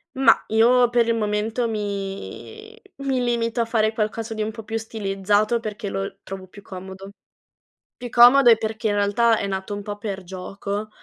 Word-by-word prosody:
Mah, 270 +1 +4
io 240 +2 +4
per 240 -1 +2
il 230 - +2
momento 220 +2 -1
mi 210 - -6 0.3
mi 265 -2 0
limito 235 0 0
a - - +1
fare 220 -1 +1
qualcosa 225 +1 -2
di 215 - -4
un 215 - -1
po' 220 0 -9
più 225 +1 -6
stilizzato 210 +1 0
perché 210 -2 -5
lo 195 0 -4
trovo 190 -1 -8
più 205 +2 -14
comodo. 190 +1 -9 0.9
Più 245 -1 -7
comodo 245 +2 +7
è 225 - +7
perché 220 +1 -4
in 205 - 0
realtà 220 +3 +3
è 200 - -2
nato 190 +1 -4
un 205 - -5
po' 205 0 -6
per 200 -3 -5
gioco, 195 +3 -5
215 Hz, 180 wpm, -23 LUFS, 200-235 Hz, 0.9 s, comodo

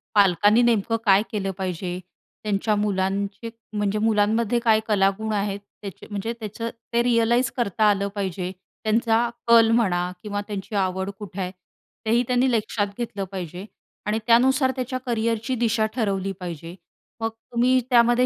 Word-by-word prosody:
पालकांनी 205 +3 +5
नेमकं 225 -2 +2
काय 200 0 +5
केलं 195 -3 -2
पाहिजे? 180 -1 -3 0.4
त्यांच्या 210 +1 +1
मुलांचे 200 +2 -1 0.3
म्हणजे 210 0 0
मुलांमध्ये 220 +2 +2
काय 220 -1 +6
कलागुण 210 +1 +1
आहेत? 200 -1 -1 0.2
त्याचे 200 -3 -9
म्हणजे 205 +3 -3
त्याचं 220 +1 -4 0.2
ते 235 0 +3
रिअलाईज 235 +1 +2
करता 220 -2 0
आलं 200 -1 +1
पाहिजे. 185 -2 -3 0.3
त्यांचा 225 +1 +2 0.3
कल 230 -1 +7
म्हणा 175 -5 +1 0.2
किंवा 205 -1 -3
त्यांची 205 0 -5
आवड 190 +1 -2
कुठे 200 -2 -8
आहे 180 0 -3 0.5
तेही 235 +3 +3
त्यांनी 250 +1 +2
लक्षात 215 -2 0
घेतलं 215 -5 -3
पाहिजे 180 0 -6 0.4
आणि 215 +1 +1
त्यानुसार 260 +3 +4
त्याच्या 255 0 -3
करियरची 230 +1 -1
दिशा 220 -1 +2
ठरवली 195 -4 -1
पाहिजे. 170 -1 -7 0.5
मग 225 - +1
तुम्ही 240 +3 +1
त्यामध्ये 240 0 +5
215 Hz, 140 wpm, -24 LUFS, 195-235 Hz, 0.5 s, कल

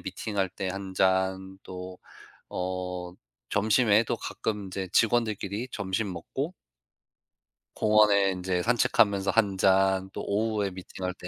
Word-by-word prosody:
미팅할 100 -3 -2
때 95 +1 -5
1 95 0 -5
잔 95 0 +1
또 90 0 -8 0.5
어 90 -1 -4 0.4
점심에도 110 +1 +3
가끔 105 -3 -4
인제 95 -1 -5
직원들끼리 110 0 +1
점심 95 0 -2
먹고 135 - -4 1.2
공원에 105 -2 +4
인제 90 -1 -1
산책하면서 100 -4 +3
1 100 -4 +2
잔, 95 0 +3
또 - - -5
오후에 105 -1 0
미팅할 90 0 -6
때 90 - -9
95 Hz, 230 characters per minute, -27 LUFS, 95-105 Hz, 1.2 s, 공원에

